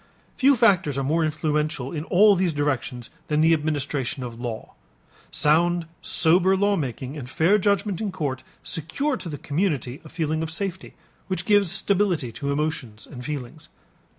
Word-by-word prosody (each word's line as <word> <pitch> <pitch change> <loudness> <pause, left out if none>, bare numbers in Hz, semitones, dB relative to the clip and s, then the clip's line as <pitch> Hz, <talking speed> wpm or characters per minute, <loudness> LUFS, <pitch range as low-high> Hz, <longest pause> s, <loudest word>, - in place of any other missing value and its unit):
Few 275 +1 +5
factors 190 - +3
are 135 - 0
more 160 +5 +1
influential 150 -3 -1
in 155 -1 -4
all 200 +3 +5
these 180 -3 +1
directions 135 -4 -2 0.2
than 150 -2 +1
the 165 +1 +5
administration 145 -4 -1
of 120 -1 -7
law. 115 -3 -5 0.6
Sound 170 +3 +2 0.2
sober 180 +3 +3
lawmaking 150 - -1
and 130 -5 -7
fair 175 +10 +3
judgment 200 -1 0
in 210 -3 -2
court 135 -6 -3 0.2
secure 260 - -2
to 175 - -7
the 145 - -5
community 145 - -2
a 155 - -12
feeling 160 -1 -2
of 160 - -3
safety 190 +2 -5 0.3
which 185 -2 -2
gives 205 -4 +3
stability 195 - +1
to 140 +5 -3
emotions 140 -8 -3
and 125 -3 -10
feelings. 145 +1 -6
155 Hz, 155 wpm, -24 LUFS, 140-185 Hz, 0.6 s, Few